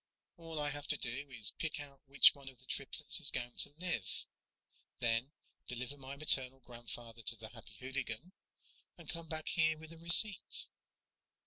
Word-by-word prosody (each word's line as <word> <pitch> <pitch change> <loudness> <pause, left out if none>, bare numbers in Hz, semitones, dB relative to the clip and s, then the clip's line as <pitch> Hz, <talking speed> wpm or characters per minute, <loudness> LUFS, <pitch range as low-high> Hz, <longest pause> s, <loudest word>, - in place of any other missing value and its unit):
"All 165 -2 -6
I 145 -1 -2
have 145 +1 -7
to 145 - +7
do 130 +4 -3
is 115 -5 +4
pick 160 -1 -3
out 140 -2 -11
which 140 +1 +7
one 140 -2 -11
of 130 - -14
the - - -17
triplets - - +1
is - - +3
going 120 0 -3
to - - +4
live, 165 - -3 0.7
then 120 +3 -1 0.4
deliver 125 +3 -5
my 135 0 -9
maternal 135 -3 +5
grandfather 120 -1 -9
to 115 - +4
the 110 0 -11
Happy 115 -2 -12
Hooligan, 130 +3 -4 0.7
and - - -13
come 165 -1 -4
back 155 0 -4
here 160 -1 +1
with 160 +1 -12
a 165 - -15
receipt." 180 +5 +4
140 Hz, 175 wpm, -34 LUFS, 120-160 Hz, 0.7 s, to